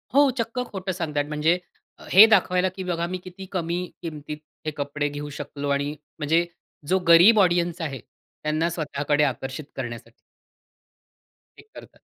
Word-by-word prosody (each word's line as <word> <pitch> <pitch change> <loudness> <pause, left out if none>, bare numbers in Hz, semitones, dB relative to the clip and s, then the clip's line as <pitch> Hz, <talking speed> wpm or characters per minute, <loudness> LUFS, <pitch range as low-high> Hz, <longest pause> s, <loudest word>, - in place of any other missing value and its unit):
हो, 285 -1 +6
चक्क 230 +2 -2
खोटं 190 -1 -3
सांगतायेत 150 -5 -2
म्हणजे 155 +3 +2 0.5
हे 195 +4 +10
दाखवायला, 185 -3 +3
की 185 +1 -7
बघा 170 -2 -1
मी 185 +1 -3
किती 185 +1 -9
कमी 175 -1 -1 0.2
किमतीत 150 -2 -6 0.3
हे 155 - -1
कपडे 145 +1 -2
घेऊ 145 0 -6
शकलो 145 0 -5
आणि 140 +1 0 0.2
म्हणजे 165 +3 +2 0.4
जो 190 +1 +3
गरीब 175 +7 +8
ऑडियन्स 175 -2 +2
आहे 135 -5 -4 0.4
त्यांना 155 +2 0
स्वतःकडे 150 -2 0
आकर्षित 135 +2 -3
करण्यासाठी 115 -3 -6 1.5
हे - - -14
करतात. - - -13
165 Hz, 145 wpm, -24 LUFS, 145-185 Hz, 1.5 s, हे